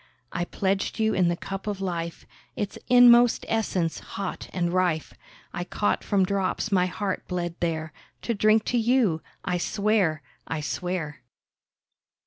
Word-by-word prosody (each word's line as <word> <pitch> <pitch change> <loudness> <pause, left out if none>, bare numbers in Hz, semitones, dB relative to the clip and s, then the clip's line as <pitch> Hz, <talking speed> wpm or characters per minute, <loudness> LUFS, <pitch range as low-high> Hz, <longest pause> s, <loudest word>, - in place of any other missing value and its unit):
I 175 0 -2
pledged 195 +2 -1
you 220 -1 +2
in 185 -2 +3
the 170 - +1
cup 195 +2 -6
of 205 -2 -2
life, 170 -3 -4 0.3
Its 205 -1 -3
inmost 245 -1 +7
essence, 190 -7 0
hot 195 -2 -6
and 175 -1 -1
rife, 180 -4 0 0.4
I 175 - -3
caught 205 +3 -1
from 195 -2 +2
drops 195 +3 -1
my 180 -2 +3
heart 195 +1 -3
bled 175 -2 -2
there, 160 -2 -2 0.3
To 235 - 0
drink 215 +1 +3
to 240 - +3
you, 225 -9 +2 0.2
I 180 0 0
swear—I 180 -8 -1
swear! 150 -2 -3
185 Hz, 140 wpm, -26 LUFS, 175-215 Hz, 0.4 s, inmost